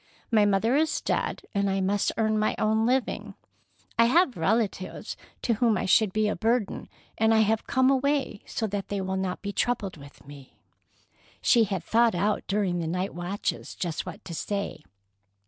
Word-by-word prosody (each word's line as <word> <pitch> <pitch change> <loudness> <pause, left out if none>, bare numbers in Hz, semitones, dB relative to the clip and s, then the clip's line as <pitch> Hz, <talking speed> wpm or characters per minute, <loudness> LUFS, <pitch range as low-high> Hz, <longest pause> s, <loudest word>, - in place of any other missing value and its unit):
"My 215 -2 +5
mother 205 +5 +2
is 315 +2 +2
dead, - - -2
and 200 0 +1
I 195 0 0
must 195 +1 +1
earn 215 -1 +1
my 215 - +1
own 220 +1 +2
living. 255 +1 -1 0.6
I 230 - +7
have 305 +2 +3
relatives 190 +2 -1 0.3
to 235 - +2
whom 225 -1 +2
I - - -2
should 205 +2 +4
be 215 +2 +1
a 210 - 0
burden, 225 -2 -1 0.3
and 225 0 +4
I 220 - +5
have 220 +1 +1
come 260 -1 +3
away 275 -4 0
so 225 - -2
that 205 -2 -3
they 205 - -2
will 190 0 -2
not 190 0 -3
be 200 0 -3
troubled 205 -8 -1
with 140 -1 -14
me." 140 -2 -13 0.8
She 235 -3 +4
had 190 -5 -3
thought 230 +1 +3
out 205 +4 0
during 195 -3 0
the 165 - -2
night 180 +4 -2
watches 175 +4 -4
just 170 -3 -3
what - - -9
to 170 - -7
say. 200 +1 -3
210 Hz, 180 wpm, -27 LUFS, 190-230 Hz, 0.8 s, I